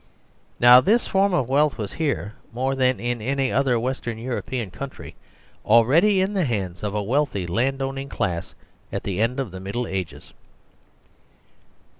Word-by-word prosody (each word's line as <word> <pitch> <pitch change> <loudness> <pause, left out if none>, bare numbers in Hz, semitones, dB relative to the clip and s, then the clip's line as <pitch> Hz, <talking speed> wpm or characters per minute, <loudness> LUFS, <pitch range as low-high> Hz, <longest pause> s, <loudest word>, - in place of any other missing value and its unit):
Now 125 +1 +8
this 225 - +2
form 195 +1 +2
of 155 -9 +1
wealth 145 +2 +2
was 105 -4 -5
here, 145 -9 -2 0.2
more 130 +3 -1
than 130 -1 +1
in 120 -1 -2
any 135 +3 0
other 130 -3 +2
Western 120 -2 -3
European 120 -2 -4
country, 80 - -8 0.5
already 150 - +4
in 195 +2 0
the 190 -5 +1
hands 95 -8 -3
of 105 0 -3
a 105 - -1
wealthy 125 -4 0
land 130 +10 0
owning 135 +1 -4
class 85 -8 -3 0.4
at - - -4
the 100 0 -2
end 125 +4 0
of 130 -8 -3
the 95 - -8
Middle 100 +6 -3
Ages. 95 -5 -6
125 Hz, 160 wpm, -23 LUFS, 105-135 Hz, 0.5 s, Now